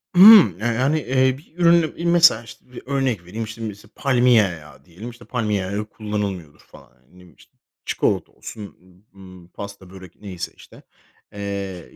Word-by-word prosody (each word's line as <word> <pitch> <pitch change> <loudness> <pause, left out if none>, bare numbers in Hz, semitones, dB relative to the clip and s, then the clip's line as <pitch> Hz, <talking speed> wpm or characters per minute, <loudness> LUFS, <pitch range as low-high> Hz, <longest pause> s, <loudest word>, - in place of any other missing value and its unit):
Hımm, 185 - +8
eee, 110 - -5
hani, 130 +7 +1
eee, 130 0 +1
bir 155 +2 -21
ürünü, 170 -2 +3
iii, 170 - -5
mesela 170 -4 +5
işte 120 +2 -16
bir 125 - -10
örnek 130 -9 -2
vereyim. 110 +6 -6
İşte 110 +1 -9
mesela 105 -2 -8
palmiye 125 -4 +3
yağı 80 -7 -8
diyelim. 95 +7 -10
İşte 120 0 -15
"palmiye 105 -5 -2
yağı 95 +2 -5
yok, 105 +1 -4
kullanılmıyordur" 100 -8 -5
falan. - - -19
Yani, 65 +1 -34
ne - - -25
bileyim, 90 -1 -19
işte. - - -24 0.3
Çikolata - - -1
olsun, 105 -2 -11 0.4
ımm, 95 -2 -15
pasta, 100 0 -10
börek 95 -2 -14
neyse 95 -4 -7
işte, - - -17 0.5
eee, 100 -3 -6
105 Hz, 175 wpm, -21 LUFS, 95-130 Hz, 0.5 s, Hımm